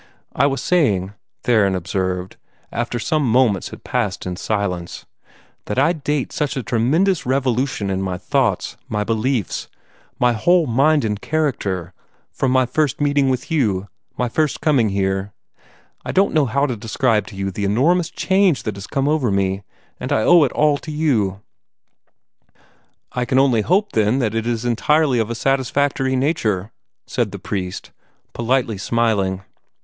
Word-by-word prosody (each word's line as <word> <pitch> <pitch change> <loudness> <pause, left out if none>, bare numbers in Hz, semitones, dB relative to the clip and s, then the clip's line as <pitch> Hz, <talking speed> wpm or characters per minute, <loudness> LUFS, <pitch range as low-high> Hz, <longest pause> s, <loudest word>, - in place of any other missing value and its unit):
"I 140 - +3
was 135 -1 -2
saying," 105 - +1 0.3
Theron 105 -5 +3
observed, 95 0 -3 0.3
after 120 +1 -2
some 155 +6 0
moments 120 -6 +2
had - - -11
passed - - -2
in 90 -1 -3
silence, 90 -3 -3 0.6
"that 105 - -4
I 145 +6 +4
date 145 -3 -2
such 145 -2 -2
a 130 - -2
tremendous 155 - +1
revolution 130 -4 0
in 95 0 -1
my 95 -2 -2
thoughts, 125 -3 0
my 105 -1 -1
beliefs, 115 0 -1 0.5
my 125 -2 +3
whole 175 +9 +3
mind 140 +3 +3
and 105 -1 -2
character, 100 - -2 0.4
from 135 - -1
my 130 0 +3
first 145 +2 0
meeting 145 -2 +2
with 130 +3 -2
you, 105 -11 0 0.3
my 125 - 0
first 150 +5 0
coming 135 -8 +2
here. 95 0 -1 0.7
I - - -3
don't 195 +1 +2
know 150 -4 +3
how 140 +5 +1
to 130 -4 -2
describe 110 0 0
to 100 - -10
you 95 0 -3
the 100 +3 -4
enormous 155 - +2
change 190 - +2
that 105 -2 -4
has 100 - -8
come 135 0 -1
over 150 -5 +1
me; 95 0 0 0.4
and - - -5
I 110 - +2
owe 175 +3 +6
it 130 - -2
all 150 -1 +2
to - - -10
you." 115 -11 0 1.7
"I 125 - -1
can 130 - 0
only 130 -5 +4
hope, 195 - +1
then, 110 +3 +2
that 115 -5 0
it 115 0 -2
is 120 0 -2
entirely 130 +3 +2
of 110 0 -1
a 115 - -3
satisfactory 135 +1 0
nature," 115 - 0 0.3
said - - -1
the - - -6
priest, 90 -2 -5 0.4
politely 120 -3 0
smiling. 100 -4 0
120 Hz, 160 wpm, -20 LUFS, 100-140 Hz, 1.7 s, owe